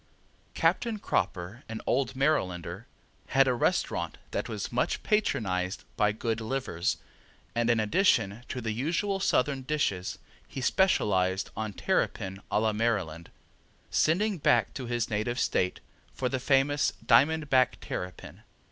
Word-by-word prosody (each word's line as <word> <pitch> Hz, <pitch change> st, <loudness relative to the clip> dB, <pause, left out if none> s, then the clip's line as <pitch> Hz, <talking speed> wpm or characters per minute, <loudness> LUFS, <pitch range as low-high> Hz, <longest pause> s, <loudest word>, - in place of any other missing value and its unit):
Captain 230 Hz, -2 st, +1 dB
Cropper, 95 Hz, -, -2 dB
an 115 Hz, -1 st, -4 dB
old 130 Hz, 0 st, 0 dB
Marylander, 95 Hz, -, -1 dB, 0.4 s
had 135 Hz, 0 st, +4 dB
a 130 Hz, -, +3 dB
restaurant 175 Hz, +9 st, 0 dB
that -, -, -2 dB
was -, -, -4 dB
much -, -, 0 dB
patronized 95 Hz, -, 0 dB
by 105 Hz, 0 st, +3 dB
good 115 Hz, +1 st, -2 dB
livers, 110 Hz, -8 st, -1 dB, 0.6 s
and 120 Hz, 0 st, +1 dB
in 115 Hz, -1 st, +4 dB
addition 110 Hz, -, +2 dB
to 125 Hz, -, -4 dB
the 110 Hz, -1 st, -2 dB
usual 170 Hz, -, -1 dB
Southern 140 Hz, -6 st, +1 dB
dishes 130 Hz, -10 st, -1 dB, 0.3 s
he -, -, -7 dB
specialized 100 Hz, -, +2 dB
on 110 Hz, -1 st, -3 dB
terrapin 95 Hz, 0 st, -1 dB
a -, -, +2 dB
la 110 Hz, 0 st, +1 dB
Maryland, 100 Hz, -8 st, -1 dB, 0.6 s
sending 195 Hz, +4 st, +2 dB
back 120 Hz, -6 st, +3 dB
to 130 Hz, -3 st, -5 dB
his 120 Hz, -1 st, -1 dB
native 110 Hz, +3 st, -1 dB
State 90 Hz, 0 st, 0 dB, 0.3 s
for 125 Hz, -, -1 dB
the 130 Hz, -, -1 dB
famous 140 Hz, +2 st, +2 dB
diamond 150 Hz, +6 st, +4 dB
back 130 Hz, -1 st, +3 dB
terrapin. 90 Hz, 0 st, -6 dB
120 Hz, 135 wpm, -29 LUFS, 100-140 Hz, 0.6 s, had